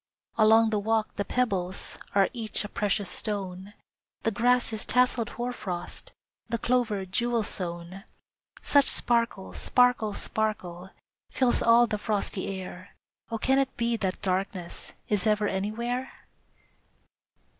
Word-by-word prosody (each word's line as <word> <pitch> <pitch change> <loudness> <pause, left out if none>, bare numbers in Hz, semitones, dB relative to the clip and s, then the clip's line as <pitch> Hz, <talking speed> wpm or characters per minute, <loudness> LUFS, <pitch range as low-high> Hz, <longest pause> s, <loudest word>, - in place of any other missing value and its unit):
Along 220 0 +5
the 210 - +1
walk, 220 +1 0
the 200 - 0
pebbles 195 -7 -2 0.2
Are 195 -1 +5
each 225 -4 -1
a - - -5
precious 205 -1 -1
stone; 195 0 -4 0.5
The 225 - +1
grass 240 +2 +2
is 215 - -3
tasseled 250 -2 +2
hoarfrost, 240 -8 -5 0.4
The 230 - 0
clover 230 -5 0
jewel 235 +4 0
sown. 175 +1 -5 0.6
Such 285 -1 +5
sparkle, 230 -5 +2
sparkle, 245 -4 +2
sparkle 190 -5 -2 0.4
Fills 255 -2 +2
all 235 +1 +6
the 210 -2 -3
frosty 205 -2 -1
air, 185 +1 -10 0.3
Oh, 230 - -2
can 265 +4 +2
it 270 -1 -1
be 235 0 +1
that 195 -4 -3
darkness 185 -2 -3
Is 210 0 +1
ever 210 -1 +2
anywhere! 235 +7 -2
215 Hz, 125 wpm, -27 LUFS, 195-235 Hz, 0.6 s, all